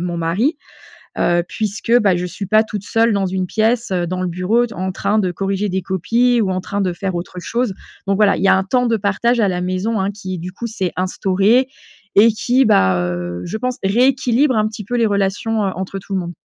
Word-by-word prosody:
mon 175 Hz, 0 st, -3 dB
mari, 190 Hz, -, 0 dB, 0.6 s
heu, 175 Hz, 0 st, +2 dB
puisque, 210 Hz, +5 st, 0 dB
bah, 195 Hz, -4 st, +3 dB
je 180 Hz, +1 st, -2 dB
suis 185 Hz, +3 st, -6 dB
pas 215 Hz, +3 st, +4 dB
toute 210 Hz, -2 st, -6 dB
seule 225 Hz, +2 st, +2 dB
dans 200 Hz, -1 st, 0 dB
une 185 Hz, 0 st, -2 dB
pièce, 225 Hz, +2 st, 0 dB
heu, 180 Hz, -1 st, 0 dB
dans 185 Hz, +1 st, -3 dB
le -, -, -1 dB
bureau, 185 Hz, +8 st, +1 dB
d 230 Hz, -, -11 dB
en 185 Hz, +1 st, -3 dB
train 200 Hz, +3 st, 0 dB
de 185 Hz, -3 st, 0 dB
corriger 195 Hz, +3 st, -2 dB
des 190 Hz, 0 st, -2 dB
copies 230 Hz, +7 st, +1 dB
ou 200 Hz, -4 st, 0 dB
en 185 Hz, 0 st, -1 dB
train 200 Hz, +2 st, -4 dB
de 185 Hz, -2 st, 0 dB
faire 190 Hz, +1 st, -4 dB
autre 175 Hz, +1 st, -6 dB
chose. 235 Hz, +5 st, -1 dB, 0.4 s
Donc, 195 Hz, -, +2 dB
voilà, 205 Hz, -1 st, +4 dB
il 175 Hz, -, -4 dB
y 195 Hz, -, +3 dB
a -, -, +6 dB
un 190 Hz, -, 0 dB
temps 245 Hz, +5 st, +1 dB
de 230 Hz, -, +2 dB
partage 215 Hz, +4 st, 0 dB
à 220 Hz, -, +3 dB
la 180 Hz, -2 st, -1 dB
maison, 185 Hz, +4 st, -1 dB
hein, 190 Hz, +1 st, 0 dB
qui, 190 Hz, -3 st, -6 dB
du 180 Hz, +2 st, -6 dB
coup, 215 Hz, +6 st, -6 dB
s'est 200 Hz, -5 st, -3 dB
instauré 195 Hz, +7 st, +2 dB, 0.5 s
et 220 Hz, +3 st, +7 dB
qui, 250 Hz, +4 st, +2 dB
bah, 95 Hz, -, +3 dB
heu, 90 Hz, 0 st, -4 dB
je 220 Hz, -, -4 dB
pense 250 Hz, +2 st, -3 dB
rééquilibre 255 Hz, +4 st, +2 dB
un 215 Hz, -, +2 dB
petit 215 Hz, -1 st, -6 dB
peu 245 Hz, +5 st, -2 dB
les 230 Hz, -2 st, +3 dB
relations, 205 Hz, +2 st, 0 dB
heu, 195 Hz, -, 0 dB
entre 190 Hz, +1 st, -5 dB
tout 195 Hz, -, -7 dB
le 190 Hz, -, +1 dB
monde. 175 Hz, -1 st, -5 dB
200 Hz, 240 wpm, -18 LUFS, 185-225 Hz, 0.6 s, et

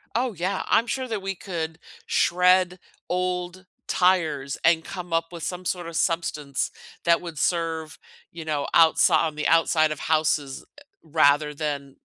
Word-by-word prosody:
Oh, 245 Hz, 0 st, 0 dB
yeah, 185 Hz, +2 st, -2 dB
I'm 230 Hz, -, +3 dB
sure 260 Hz, +1 st, -2 dB
that 220 Hz, -4 st, -3 dB
we 195 Hz, 0 st, -3 dB
could 165 Hz, -3 st, -5 dB, 0.3 s
shred 180 Hz, +1 st, +3 dB, 0.3 s
old 180 Hz, 0 st, -2 dB, 0.2 s
tires 160 Hz, -7 st, +1 dB
and 165 Hz, -1 st, +4 dB
come 180 Hz, 0 st, -8 dB
up 165 Hz, 0 st, +2 dB
with 170 Hz, -2 st, -8 dB
some 180 Hz, 0 st, -4 dB
sort 175 Hz, -1 st, -2 dB
of 165 Hz, -, -8 dB
substance 150 Hz, -5 st, -1 dB, 0.3 s
that 170 Hz, 0 st, +4 dB
would 170 Hz, -3 st, -8 dB
serve, 165 Hz, -2 st, -1 dB, 0.3 s
you 165 Hz, -1 st, -8 dB
know, 150 Hz, -2 st, -2 dB
outsi 160 Hz, -1 st, +5 dB
on 160 Hz, -2 st, +1 dB
the 150 Hz, 0 st, -1 dB
outside 160 Hz, -1 st, +3 dB
of 155 Hz, -, -4 dB
houses 155 Hz, -3 st, 0 dB
e -, -, -14 dB, 0.2 s
rather 150 Hz, -2 st, +2 dB
than 140 Hz, -2 st, -4 dB
165 Hz, 160 wpm, -24 LUFS, 155-180 Hz, 0.3 s, outsi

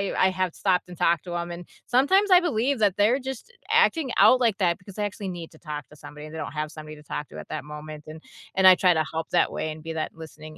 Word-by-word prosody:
I -, -, +3 dB
I -, -, +5 dB
have 185 Hz, -2 st, -2 dB
stopped 180 Hz, -2 st, 0 dB
and 175 Hz, -, -10 dB
talked 170 Hz, -2 st, +2 dB
to 175 Hz, -1 st, -6 dB
'em, 170 Hz, 0 st, -4 dB
and 175 Hz, 0 st, -8 dB, 0.2 s
sometimes 380 Hz, +12 st, +3 dB
I 360 Hz, 0 st, +8 dB
believe 270 Hz, -4 st, 0 dB
that 205 Hz, -2 st, +2 dB
they're 225 Hz, +6 st, +3 dB
just 265 Hz, -, -7 dB, 0.2 s
acting 325 Hz, -, +3 dB
out 235 Hz, +6 st, +6 dB
like 225 Hz, -4 st, +2 dB
that 175 Hz, -4 st, +1 dB
because 190 Hz, 0 st, -14 dB
they 210 Hz, -1 st, -1 dB
actually 205 Hz, -1 st, -5 dB
need 170 Hz, -2 st, -7 dB
to 155 Hz, -, -17 dB
talk 150 Hz, -1 st, -7 dB
to 150 Hz, -, -17 dB
somebody, 150 Hz, +1 st, -11 dB
they 160 Hz, +1 st, -9 dB
don't 155 Hz, -, -5 dB
have 150 Hz, 0 st, -3 dB
somebody 155 Hz, -1 st, -10 dB
to 150 Hz, -, -15 dB
talk 150 Hz, 0 st, -5 dB
to -, -, -9 dB
at -, -, -10 dB
that -, -, -4 dB
moment, 150 Hz, 0 st, -9 dB
and 155 Hz, +1 st, -10 dB, 0.3 s
and 190 Hz, 0 st, +5 dB
I 185 Hz, -, +9 dB
try 180 Hz, -1 st, +4 dB
to 155 Hz, -1 st, 0 dB
help 160 Hz, 0 st, -4 dB
that 175 Hz, -, +2 dB
way 155 Hz, -, -3 dB
and 155 Hz, 0 st, -9 dB
be 165 Hz, 0 st, -6 dB
that 155 Hz, -1 st, -3 dB
listening 155 Hz, -1 st, -11 dB
175 Hz, 280 wpm, -25 LUFS, 155-215 Hz, 0.3 s, I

